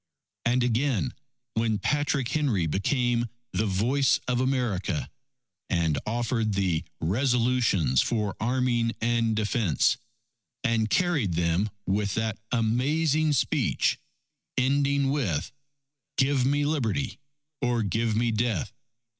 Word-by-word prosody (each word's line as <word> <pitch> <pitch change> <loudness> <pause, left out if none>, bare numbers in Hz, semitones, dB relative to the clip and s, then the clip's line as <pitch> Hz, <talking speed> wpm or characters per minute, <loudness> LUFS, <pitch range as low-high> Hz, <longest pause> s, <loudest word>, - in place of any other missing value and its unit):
And 125 +2 +2
again, 125 0 0 0.4
when 110 -1 +1
Patrick 145 0 0
Henry 130 - +1
became 120 - 0 0.2
the 110 - 0
voice 120 +8 +2
of 125 0 +1
America, 120 - -1 0.6
and 80 -4 +1
offered 115 -2 0
the 90 -4 +1 0.2
"Resolutions 115 - +2
for 105 -4 -1
Arming 120 -1 +1
and 115 -1 +1
Defense," 105 - +1 0.7
and 115 -3 +1
carried 150 - +1
them 85 +5 +1 0.2
with 100 +1 0
that 110 -2 -1
amazing 145 +7 +2
speech 135 - +1 0.6
ending 140 +1 +2
with: 105 - -1 0.7
_Give 135 -1 +2
me 145 +2 +2
Liberty 140 -3 -1 0.4
or 120 -3 +1
give 110 +3 0
me 115 +1 +1
Death! 115 +2 -1
115 Hz, 105 wpm, -27 LUFS, 105-130 Hz, 0.7 s, And